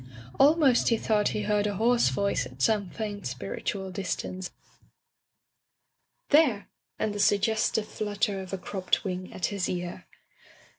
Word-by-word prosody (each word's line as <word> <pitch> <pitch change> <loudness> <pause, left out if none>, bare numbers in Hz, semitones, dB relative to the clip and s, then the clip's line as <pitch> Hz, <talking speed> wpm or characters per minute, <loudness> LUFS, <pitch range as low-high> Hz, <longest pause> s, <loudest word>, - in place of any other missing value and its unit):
Almost 280 -2 +5
he 230 - +3
thought 215 -1 +1
he 210 - -1
heard 210 0 +1
a 205 - -2
hoarse 235 +4 +3
voice 200 0 0
at - - -16
some 210 -4 +2
faint, 205 - -5
spiritual 130 - -4
distance, 185 0 -4 0.2
urging: - - -34 1.5
"There!" 215 -7 -4 0.3
and 215 - -1
the 205 - -5
sugges 215 +2 +2
tive 215 -1 -1
flutter 205 -1 -2
of 185 - -9
a 195 - -2
cropped 185 0 -1
wing 185 -1 -4
at 175 - -2
his 195 -3 -1
ear. 180 0 -5
205 Hz, 150 wpm, -27 LUFS, 185-215 Hz, 1.5 s, Almost